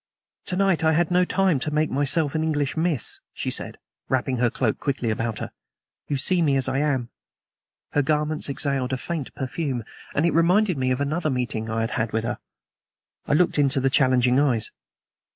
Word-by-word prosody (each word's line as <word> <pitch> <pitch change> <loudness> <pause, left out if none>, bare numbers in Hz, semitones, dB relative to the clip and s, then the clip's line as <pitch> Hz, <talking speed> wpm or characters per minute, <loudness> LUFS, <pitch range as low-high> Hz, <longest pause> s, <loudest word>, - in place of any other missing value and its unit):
"To 180 - 0
night 190 -3 +2
I 160 0 +4
had 170 +1 +1
no 180 0 +4
time 185 -5 +2
to 150 - -2
make 150 +1 0
myself 145 +2 +2
an 160 0 0
English 145 -3 0
miss," 160 -6 0 0.2
she - - -2
said, - - -2 0.3
wrapping 130 0 0
her 120 0 +2
cloak 115 -1 -1
quickly 130 -5 -1
about 110 0 -2
her. - - -5 0.6
"You 145 - -1
see 175 +6 +1
me 145 -4 +3
as 135 -1 +1
I 130 +1 0
am." 135 -5 0 0.8
Her 145 - +2
garments 150 +1 0
exhaled 135 -2 -1
a - - 0
faint 155 0 -4
perfume, 130 -2 -3 0.3
and 145 - +2
it 170 - +2
reminded 180 +4 +3
me 130 -2 0
of 130 +2 0
another 155 +3 0
meeting 125 -4 -2
I 110 0 -1
had 115 - -2
had 110 0 -2
with 110 0 0
her. 120 - -3 0.9
I - - +1
looked 160 0 +3
into 140 -1 +3
the 135 0 +1
challenging 130 -1 +3
eyes. 125 -7 +2
140 Hz, 195 wpm, -24 LUFS, 125-160 Hz, 0.9 s, I